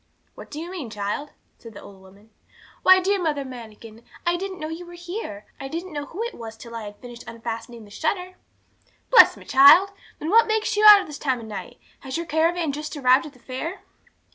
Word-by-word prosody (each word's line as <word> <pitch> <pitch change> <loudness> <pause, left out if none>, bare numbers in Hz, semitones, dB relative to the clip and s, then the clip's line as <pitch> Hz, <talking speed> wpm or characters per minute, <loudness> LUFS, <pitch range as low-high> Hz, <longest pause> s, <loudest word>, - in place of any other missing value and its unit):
'What - - -12
do 300 - -7
you 340 +3 -7
mean, 325 -11 -6
child?' 210 +7 -4 0.3
said 225 -2 -13
the - - -10
old 195 -1 -14
woman. 200 +3 -19 0.5
'Why, 375 0 +7
dear 390 +1 0
Mother 295 -4 -1
Manikin, 230 -2 -11 0.2
I 345 0 +2
didn't 375 +1 -5
know 310 - -4
you 325 +2 -7
were 350 0 -12
here. 345 - -7
I 270 - -6
didn't 335 +4 -6
know 290 -1 -5
who 405 +7 -5
it 475 - -5
was 225 -1 -9
till 235 +1 -12
I 230 -2 -6
had 205 0 -10
finished 240 0 -11
unfastening 230 0 -7
the 205 - -17
shutter.' 360 - -3 0.8
'Bless 470 -2 +7
me, - - -14
child! 285 +9 +7 0.3
then 315 - -4
what 455 +1 +6
makes 440 0 0
you 420 - +1
out 410 -1 +10
at - - -8
this 300 -2 -9
time 260 -4 -1
of 230 - -9
night? 215 -2 -8 0.2
Has 265 +1 -5
your 335 - -4
caravan 325 +1 0
just 300 +2 -6
arrived 260 +3 +3
at 290 - -13
the - - -20
fair?' 265 +9 -6
295 Hz, 220 wpm, -23 LUFS, 230-355 Hz, 0.8 s, out